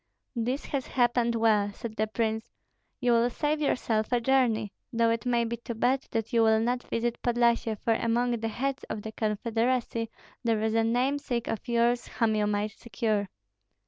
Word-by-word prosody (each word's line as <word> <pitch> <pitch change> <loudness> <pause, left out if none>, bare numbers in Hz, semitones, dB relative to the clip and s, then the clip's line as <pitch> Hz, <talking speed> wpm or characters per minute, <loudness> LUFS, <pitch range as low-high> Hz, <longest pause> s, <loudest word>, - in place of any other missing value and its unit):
"This 245 +4 -1
has 275 -3 -3
happened 240 -1 +2
well," 215 -3 +3
said 220 +1 -7
the 220 0 0
prince, 220 0 -2 0.5
"You 245 -2 +2
will 235 +1 +4
save 300 +4 -1
yourself 225 -6 0
a 245 - +3
journey, 235 -4 +2 0.2
though 230 -1 +2
it 230 +1 -2
may 240 -1 +2
be 235 +1 -3
too 235 0 -6
bad 255 +4 +1
that 225 -1 -3
you 230 - +4
will 220 -1 +5
not 245 +2 0
visit 235 0 -2
Podlyasye, 235 -2 +2
for 225 - +1
among 235 +2 +1
the 225 - -2
heads 270 +5 -2
of 210 - -5
the 220 - -5
confederacy 230 +2 -1 0.3
there 225 -2 +2
is 220 0 +1
a 225 0 +3
namesake 245 +1 0
of 225 - -4
yours 235 0 +2
whom 225 -2 +1
you 210 -1 +1
might 210 0 0
secure." 210 -2 -2
230 Hz, 180 wpm, -28 LUFS, 220-245 Hz, 0.5 s, will